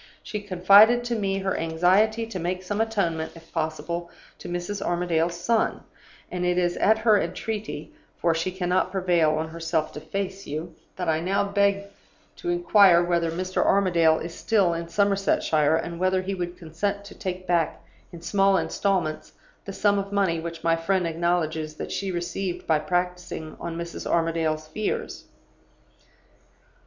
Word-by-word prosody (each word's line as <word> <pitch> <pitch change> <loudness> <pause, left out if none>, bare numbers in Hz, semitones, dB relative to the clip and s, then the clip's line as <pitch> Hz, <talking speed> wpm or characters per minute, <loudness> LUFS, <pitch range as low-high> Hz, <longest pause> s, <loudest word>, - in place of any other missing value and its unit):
She 210 - -4
confided 205 +5 +6
to 240 -1 -2
me 195 -3 -1
her 190 -1 -1
anxiety 185 +8 +2
to 220 -5 -6
make 180 +2 -3
some 205 +3 -1
atonement, 175 -8 -1
if 165 0 -15
possible, 160 +2 -3 0.3
to - - -8
Mrs. 175 +3 -4
Armadale's 175 -1 0
son; 230 +4 0 0.5
and 180 0 -3
it 180 0 +1
is 175 -1 +1
at 220 +2 +4
her 220 -2 +4
entreaty 205 -2 -5 0.2
(for 170 -1 +2
she 165 +3 -1
cannot 185 0 0
prevail 175 -5 +2
on 160 +1 -2
herself 165 -1 -2
to - - -6
face 195 +3 -4
you) 155 +3 -5 0.2
that 180 -2 -4
I 160 -1 +2
now 190 +5 +1
beg 200 0 +1 0.5
to 350 - -4
inquire 205 - +5
whether 170 -1 +1
Mr. 185 +3 -1
Armadale 170 -5 +3
is 170 0 -6
still 195 -3 +2
in 165 0 -4
Somersetshire, 195 -6 +2
and 170 +1 -3
whether 185 0 +1
he 195 +1 -3
would 175 -1 -4
consent 200 +5 -3
to 200 - -10
take 185 -2 -5
back 170 -3 0 0.3
in 170 -1 -11
small 195 +2 +3
installments 160 -2 -1 0.3
the 195 - -5
sum 200 +1 +2
of 200 0 -5
money 195 -5 +1
which 165 0 -7
my 165 0 +3
friend 180 +2 0
acknowledges 160 -2 -1
that - - -6
she 195 - -2
received 180 +1 -3
by 155 -2 +2
practicing 175 0 -3
on 170 -1 -5
Mrs. 170 0 -6
Armadale's 165 -2 0
fears. 210 +7 -4
180 Hz, 160 wpm, -25 LUFS, 165-195 Hz, 0.5 s, confided